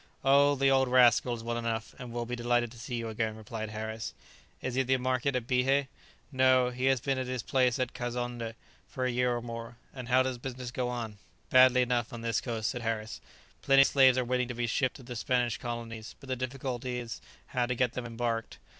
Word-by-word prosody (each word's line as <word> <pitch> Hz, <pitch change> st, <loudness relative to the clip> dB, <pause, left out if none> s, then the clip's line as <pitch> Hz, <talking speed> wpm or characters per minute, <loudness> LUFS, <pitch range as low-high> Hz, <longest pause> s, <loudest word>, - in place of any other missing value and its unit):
"Oh, 140 Hz, +1 st, +5 dB
the 135 Hz, 0 st, +3 dB
old 135 Hz, -1 st, +4 dB
rascal 125 Hz, -1 st, +5 dB
is 115 Hz, -, -9 dB
well 120 Hz, 0 st, -2 dB
enough, 115 Hz, -1 st, -3 dB
and 125 Hz, -2 st, -7 dB
will 120 Hz, 0 st, -3 dB
be 120 Hz, +1 st, -3 dB
delighted 120 Hz, -1 st, +1 dB
to 120 Hz, -, -13 dB
see 120 Hz, +1 st, -5 dB
you 115 Hz, -1 st, -3 dB
again," 110 Hz, 0 st, -2 dB
replied 110 Hz, 0 st, -6 dB
Harris. 110 Hz, +1 st, -5 dB, 0.4 s
"Is 130 Hz, -, -4 dB
he 130 Hz, -, +2 dB
at 130 Hz, -, -4 dB
the 130 Hz, 0 st, +3 dB
market 130 Hz, +1 st, 0 dB
at 125 Hz, -2 st, -1 dB
Bihé?" 135 Hz, +2 st, +2 dB, 0.4 s
"No, 130 Hz, -2 st, +4 dB
he 125 Hz, +1 st, -2 dB
has 135 Hz, -1 st, +4 dB
been 135 Hz, +1 st, -1 dB
at 130 Hz, -, -3 dB
his 125 Hz, -3 st, -3 dB
place 125 Hz, -3 st, +2 dB
at 130 Hz, -1 st, -2 dB
Kazonndé 120 Hz, -2 st, -4 dB, 0.3 s
for 130 Hz, -, -3 dB
a 130 Hz, -, +1 dB
year 125 Hz, 0 st, +1 dB
or 120 Hz, -, -4 dB
more." 115 Hz, 0 st, -7 dB, 0.2 s
"And 130 Hz, -3 st, -7 dB
how 130 Hz, +1 st, +4 dB
does 130 Hz, -2 st, -3 dB
business 125 Hz, -1 st, -6 dB
go 125 Hz, -1 st, -2 dB
on?" 115 Hz, -4 st, -5 dB, 0.3 s
"Badly 130 Hz, 0 st, +7 dB
enough, 120 Hz, 0 st, 0 dB
on 120 Hz, -2 st, -7 dB
this 115 Hz, -1 st, 0 dB
coast," 110 Hz, -3 st, -2 dB
said 125 Hz, -, -5 dB
Harris; 110 Hz, -1 st, -3 dB, 0.4 s
"plenty 135 Hz, 0 st, +6 dB
of -, -, +1 dB
slaves 130 Hz, -2 st, +6 dB
are 130 Hz, -, +1 dB
waiting 125 Hz, 0 st, 0 dB
to 120 Hz, -, -5 dB
be 120 Hz, 0 st, -1 dB
shipped 125 Hz, +2 st, 0 dB
to 130 Hz, -, -11 dB
the 125 Hz, 0 st, -7 dB
Spanish 120 Hz, -2 st, 0 dB
colonies, 115 Hz, -2 st, -6 dB
but 140 Hz, -, -13 dB
the 130 Hz, -, 0 dB
difficulty 130 Hz, -1 st, -4 dB
is 120 Hz, -1 st, -6 dB, 0.3 s
how 125 Hz, -1 st, 0 dB
to 125 Hz, -, -1 dB
get 125 Hz, 0 st, +1 dB
them 125 Hz, -2 st, -4 dB
embarked. 115 Hz, -1 st, -3 dB
125 Hz, 230 wpm, -30 LUFS, 115-130 Hz, 0.4 s, Badly